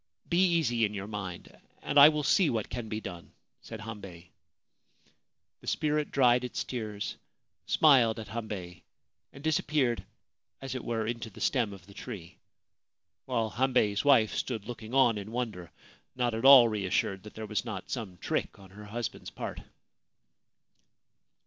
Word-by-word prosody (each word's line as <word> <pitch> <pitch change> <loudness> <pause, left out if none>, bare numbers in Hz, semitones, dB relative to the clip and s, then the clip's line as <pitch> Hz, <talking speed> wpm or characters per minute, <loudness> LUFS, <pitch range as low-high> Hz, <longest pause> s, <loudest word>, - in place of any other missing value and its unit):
Be 170 - +1
easy 120 -9 +1
in 105 -1 0
your 100 0 -4
mind, 100 -4 -7 0.3
and 145 - +3
I 145 +2 +11
will 150 -1 -1
see 165 +4 +4
what 110 -3 -2
can 120 -3 -5
be 105 0 -3
done/ 90 -5 -9 0.3
said 115 -1 -9
Hambei. 100 -6 -9 1.3
The - - -16
spirit 150 -1 0
dried 125 -2 +4
its 125 - -3
tears, 110 -5 -5 0.5
smiled 125 -8 +5
at 110 -2 -8
Hambei, 100 -6 -6 0.5
and 140 - -13
dis 160 -1 +2
appeared 135 -6 0 0.6
as 135 -1 -5
it 130 - -5
were 115 -2 -2
into 115 0 -4
the 100 - -14
stem 120 -6 +1
of 95 -3 -12
the 100 - -15
tree, 95 -7 -9 0.9
while 115 -4 -1
Hambei's 125 -5 +1
wife 130 -7 +5
stood 115 -5 -3
looking 115 +1 -7
on 120 -5 +4
in 100 +2 -8
wonder, 110 -8 -4 0.5
not 120 -2 0
at 115 +3 -2
all 135 -3 +10
reassured 100 -2 -1
that 105 - -12
there 110 - -6
was 105 0 -2
not 105 -5 -6
some 105 -8 -5
trick - - -2
on 95 -2 -15
her 105 +2 -11
husband's 115 +2 -5
part. - - -6
115 Hz, 160 wpm, -29 LUFS, 105-125 Hz, 1.3 s, I